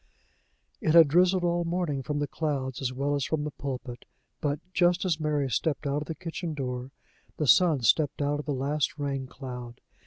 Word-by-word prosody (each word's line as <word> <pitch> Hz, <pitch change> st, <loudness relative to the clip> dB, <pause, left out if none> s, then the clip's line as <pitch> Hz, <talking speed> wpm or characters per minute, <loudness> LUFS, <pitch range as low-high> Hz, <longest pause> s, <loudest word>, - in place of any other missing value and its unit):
It 155 Hz, -, +2 dB
had 165 Hz, -2 st, +9 dB
drizzled 180 Hz, +3 st, +4 dB
all 175 Hz, 0 st, +1 dB
the 165 Hz, -, -4 dB
morning 170 Hz, -6 st, -1 dB
from 145 Hz, +3 st, -3 dB
the 145 Hz, -, 0 dB
clouds 140 Hz, -5 st, -3 dB
as 130 Hz, -1 st, -1 dB
well 140 Hz, +3 st, -1 dB
as 140 Hz, -1 st, 0 dB
from 150 Hz, +1 st, -1 dB
the 150 Hz, -, -3 dB
pulpit, 130 Hz, -3 st, -6 dB, 0.3 s
but, 145 Hz, -2 st, -1 dB
just 175 Hz, +1 st, +3 dB
as 165 Hz, -4 st, +1 dB
Mary 150 Hz, -3 st, 0 dB
stepped 145 Hz, +5 st, -1 dB
out 140 Hz, +1 st, 0 dB
of 150 Hz, -, -7 dB
the 160 Hz, -, -4 dB
kitchen 165 Hz, -2 st, -5 dB
door, 125 Hz, -2 st, -4 dB, 0.5 s
the 150 Hz, -, 0 dB
sun 160 Hz, -1 st, +5 dB
stepped 145 Hz, +5 st, +2 dB
out 145 Hz, 0 st, 0 dB
of 150 Hz, -, -7 dB
the -, -, 0 dB
last 140 Hz, +3 st, -1 dB
rain 140 Hz, -2 st, -3 dB
cloud. 125 Hz, -3 st, -8 dB
145 Hz, 205 wpm, -28 LUFS, 135-160 Hz, 0.5 s, had